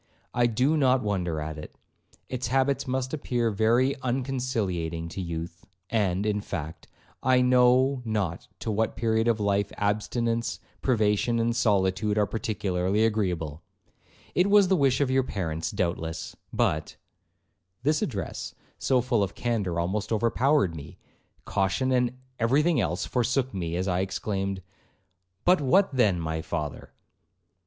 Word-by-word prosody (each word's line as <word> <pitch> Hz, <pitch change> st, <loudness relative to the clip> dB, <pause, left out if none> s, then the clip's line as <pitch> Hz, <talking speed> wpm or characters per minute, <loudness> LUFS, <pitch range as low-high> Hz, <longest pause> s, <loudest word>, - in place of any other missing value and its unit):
I 120 Hz, 0 st, +3 dB
do 130 Hz, +7 st, +2 dB
not 130 Hz, -3 st, +3 dB
wonder 90 Hz, -6 st, -1 dB
at 75 Hz, 0 st, -5 dB
it; 75 Hz, -, -10 dB, 0.5 s
its 125 Hz, -1 st, -3 dB
habits 135 Hz, +2 st, +1 dB
must 130 Hz, +1 st, -2 dB
appear 120 Hz, -6 st, 0 dB
very 115 Hz, +6 st, +3 dB
unconciliating 120 Hz, -11 st, -2 dB
to 95 Hz, -, -5 dB
youth, 85 Hz, -1 st, -5 dB, 0.3 s
and, 100 Hz, -3 st, +1 dB
in 105 Hz, -1 st, 0 dB
fact, 80 Hz, -5 st, -6 dB, 0.3 s
I 130 Hz, 0 st, +4 dB
know 125 Hz, +1 st, +4 dB
not 105 Hz, -7 st, -2 dB
to 110 Hz, -, -2 dB
what 110 Hz, +1 st, 0 dB
period 110 Hz, 0 st, +1 dB
of 115 Hz, -2 st, +2 dB
life 100 Hz, -1 st, +1 dB
abstinence, 115 Hz, +3 st, -1 dB, 0.2 s
privation, 110 Hz, -1 st, +2 dB
and 115 Hz, 0 st, +1 dB
solitude, 105 Hz, -2 st, +1 dB
are 105 Hz, -, +4 dB
particularly 100 Hz, -2 st, 0 dB
agreeable; 90 Hz, -8 st, -1 dB, 0.7 s
it 185 Hz, +3 st, +3 dB
was 200 Hz, -2 st, +6 dB
the 190 Hz, -, +4 dB
wish 135 Hz, -4 st, +2 dB
of 135 Hz, -2 st, +2 dB
your 135 Hz, 0 st, +4 dB
parents 85 Hz, -9 st, -3 dB
doubtless; 80 Hz, -2 st, -3 dB, 0.2 s
but'—This 95 Hz, -, -3 dB
address, 105 Hz, -8 st, -4 dB, 0.2 s
so 130 Hz, -2 st, +2 dB
full 120 Hz, -3 st, +1 dB
of 100 Hz, -1 st, -2 dB
candour, 105 Hz, -8 st, -1 dB
almost 95 Hz, +6 st, -2 dB
overpowered 115 Hz, -, +2 dB
me; 75 Hz, -1 st, -9 dB, 0.5 s
caution 100 Hz, +7 st, 0 dB
and 125 Hz, -1 st, +1 dB, 0.2 s
every 130 Hz, +6 st, +3 dB
thing 160 Hz, -6 st, +2 dB
else 85 Hz, -2 st, -1 dB
forsook 125 Hz, +1 st, 0 dB
me 85 Hz, -3 st, -3 dB
as 90 Hz, +2 st, -1 dB
I 90 Hz, -1 st, +1 dB
exclaimed, 95 Hz, 0 st, -2 dB, 0.8 s
'But 180 Hz, -2 st, +5 dB
what 180 Hz, +5 st, +3 dB
then, 105 Hz, -9 st, +3 dB
my 80 Hz, -1 st, -2 dB
father?' 80 Hz, -3 st, -5 dB
110 Hz, 140 wpm, -27 LUFS, 90-125 Hz, 0.8 s, was